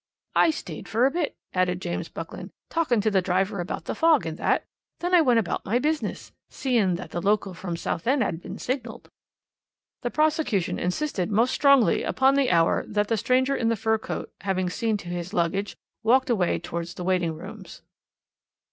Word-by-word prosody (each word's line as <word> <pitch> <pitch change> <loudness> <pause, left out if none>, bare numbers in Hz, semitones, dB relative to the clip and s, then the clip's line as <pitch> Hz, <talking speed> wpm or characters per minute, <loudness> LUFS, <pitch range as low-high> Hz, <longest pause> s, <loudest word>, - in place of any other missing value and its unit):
"'I - - +5
stayed 315 - -5
for 230 +3 +3
a 270 - +3
bit,' 335 -2 -2 0.2
added 185 -1 +1
James 175 -2 -4
Buckland, - - -7 0.2
'talking 300 -10 +2
to 215 +1 +1
the 190 -2 +3
driver 190 +2 0
about 175 - -4
the - - -2
fog 325 -3 +3
and 160 -1 -3
that; - - +1 0.3
then 355 +1 -3
I 355 - +7
went 250 -6 +4
about 220 -6 -1
my 225 +5 +1
business, 305 +4 -2 0.2
seein' 230 -9 +1
that 180 - -7
the 175 - -3
local 200 0 +1
from 175 -1 -5
Southend 250 - 0
'ad 175 -4 -3
been - - -7
signalled.' 255 +1 -5 0.9
"The 245 - -1
prosecution 305 - +1
insisted 185 +1 -1
most 230 +4 +2
strongly 275 - +4
upon 265 +1 +3
the 275 -2 +2
hour 165 -1 +3
when 205 0 +1
the 225 - 0
stranger 255 +5 +2
in 230 - +1
the 230 - +2
fur 220 +1 +1
coat, - - -5
having 185 -2 -1
seen 225 0 0
to 190 - -11
his 175 +3 -5
luggage, 195 +4 -1 0.2
walked 250 +3 +3
away 190 -7 +2
towards 170 0 -5
the 180 - -6
waiting 175 -3 +1
rooms. - - -10
215 Hz, 185 wpm, -25 LUFS, 180-260 Hz, 0.9 s, I